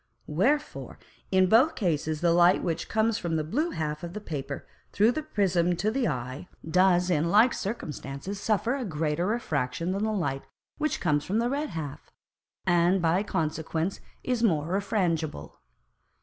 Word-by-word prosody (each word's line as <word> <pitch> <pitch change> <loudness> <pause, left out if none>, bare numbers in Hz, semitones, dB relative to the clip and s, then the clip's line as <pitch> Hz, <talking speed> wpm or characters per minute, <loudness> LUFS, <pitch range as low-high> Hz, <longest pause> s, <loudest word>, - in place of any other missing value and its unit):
Wherefore 270 - -1 0.3
in 185 -1 +4
both 245 - +5
Cases 155 -5 -1
the 170 -1 +3
Light 175 +1 +5
which 165 -2 -2
comes 220 0 +1
from 170 -2 -2
the 155 - 0
blue 290 - -1
half 150 - -3
of 170 0 -6
the 210 - -4
Paper 145 -7 -5 0.3
through 215 +4 +4
the 310 - -2
Prism 180 - +1
to 210 +5 0
the 260 0 0
Eye, 130 +2 -4 0.2
does 180 +1 +3
in 165 0 +2
like 220 +6 +5
Circumstances 185 - -5
suffer 225 +2 +1
a 275 - -3
greater 160 -2 -1
Refraction 165 - -1
than 195 +2 -1
the 220 - +1
Light 140 -10 -1 0.4
which 305 - 0
comes 145 -1 +1
from 195 +7 -1
the 235 +2 +1
red 290 +2 -1
half, 160 -7 -6 0.6
and 175 +2 +3
by 170 +2 +2
consequence 160 -1 -2 0.2
is 250 -2 -1
more 160 -9 +2
refrangible. 180 - -1
180 Hz, 165 wpm, -27 LUFS, 155-215 Hz, 0.6 s, both